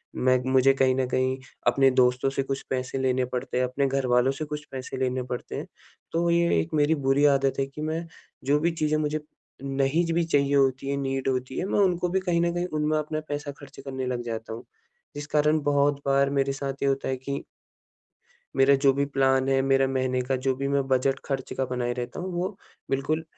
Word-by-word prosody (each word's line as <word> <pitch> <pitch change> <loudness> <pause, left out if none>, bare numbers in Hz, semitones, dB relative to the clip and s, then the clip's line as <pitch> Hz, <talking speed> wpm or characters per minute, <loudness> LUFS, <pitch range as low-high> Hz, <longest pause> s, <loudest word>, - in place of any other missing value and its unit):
मैं 130 0 +3
मुझे 135 +1 +5
कहीं 130 -1 +3
न 130 -1 +1
कहीं 130 +1 0 0.3
अपने 135 -1 +5
दोस्तों 125 +1 +3
से 135 0 -1
कुछ 135 0 -3
पैसे 130 0 -2
लेने 130 -1 +1
पड़ते 125 0 -4
हैं, 125 - +2
अपने 135 +2 0
घरवालों 130 -1 +2
से 155 +3 -5
कुछ 150 0 -6
पैसे 130 0 -6
लेने 130 -1 -1
पड़ते 125 -1 -6
हैं, - - -4 0.5
तो 170 +1 +1
ये 170 - +3
एक 80 - -3
मेरी 150 +1 +3
बुरी 140 +2 +4
आदत 135 0 +1
है 135 - +2
कि 145 +2 -9
मैं 160 +2 -2 0.4
जो 145 +2 +3
भी 170 +2 +1
चीज़ें 155 -2 0
मुझे 155 0 -1 0.4
नहीं 135 +5 +1
भी 170 0 +2
चाहिए 140 -3 +2
होती 135 0 +2
है, 140 - 0
नीड 135 -1 -2
होती 130 0 -2
है - - -1
मैं 200 - 0
उनको 180 -2 +2
भी 190 - +1
कहीं 175 -2 0
न 170 0 +1
कहीं, 175 0 -1
उनमें 155 -1 0
अपना 155 0 -2
पैसा 145 0 -3
खर्च 140 -1 -13
करने 130 -1 -4
लग 125 -1 -2
जाता 110 -1 -5
हूँ। 115 - -8 0.5
जिस 145 0 -6
कारण 150 +1 +2
बहुत 145 0 +2
बार 140 0 +3
मेरे 135 0 +1
साथ 135 0 -3
ये 140 - +2
होता 135 0 -1
है 130 - -1
कि 140 +2 -5 1.1
मेरे 135 +1 +5
जो 135 0 +4
भी 140 +1 0
प्लान 135 -1 +2
है, 135 0 +3
मेरा 135 0 +3
महीने 130 -1 0
का 130 +1 -1
जो 130 +1 0
भी 140 +1 -2
मैं 140 -1 0
बजट 135 +1 +1
खर्च 135 -2 -3
का 135 - +1
बनाए 125 -1 -2
रहता 120 0 -5
हूँ, 185 +1 -4
वो 185 +3 -3 0.3
बिल्कुल 145 +4 0
135 Hz, 220 wpm, -26 LUFS, 130-150 Hz, 1.1 s, मुझे